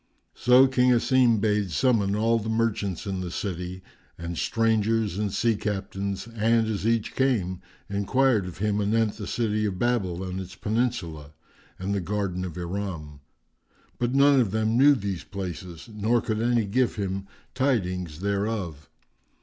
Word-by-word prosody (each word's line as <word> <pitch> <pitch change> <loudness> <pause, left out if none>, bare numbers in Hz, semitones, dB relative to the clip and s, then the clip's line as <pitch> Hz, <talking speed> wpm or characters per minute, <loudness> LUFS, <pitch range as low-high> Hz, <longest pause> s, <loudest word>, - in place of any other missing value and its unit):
So 125 +2 +6
King 125 -1 +3
Asim 125 -1 +4
bade 105 -2 +1
summon 105 -1 +2
all 115 +2 +2
the 110 +1 -5
merchants 110 -5 -1
in 95 -2 -3
the 90 - -4
city 90 0 -5 0.3
and 85 0 -5
strangers 110 0 +1
and 105 -2 -1
sea 115 +2 +1
captains 100 -1 -3
and, 115 0 +2
as 110 -1 -2
each 115 -2 0
came, 100 -9 0 0.3
enquired 105 +1 +1
of 90 - -8
him 105 +1 0
anent 110 +1 +1
the 105 -4 -6
city 110 0 0
of 95 -2 -4
Babel 95 -6 0
and 95 0 -4
its 95 0 -9
peninsula[FN#391] 105 - -2 0.5
and 95 +2 -3
the 100 - 0
garden 95 -1 -2
of 85 -3 -7
Iram; 85 -5 -5 0.8
but 120 +2 0
none 140 0 +6
of 115 -6 +2
them 110 +2 0
knew 140 +3 +6
these 100 -6 -4
places 90 -2 -7
nor 110 +3 +2
could 110 0 -2
any 120 -1 +2
give 125 +5 +1
him 95 -1 -3 0.3
tidings 90 - -1
thereof. 100 -7 -2
105 Hz, 155 wpm, -26 LUFS, 95-115 Hz, 0.8 s, So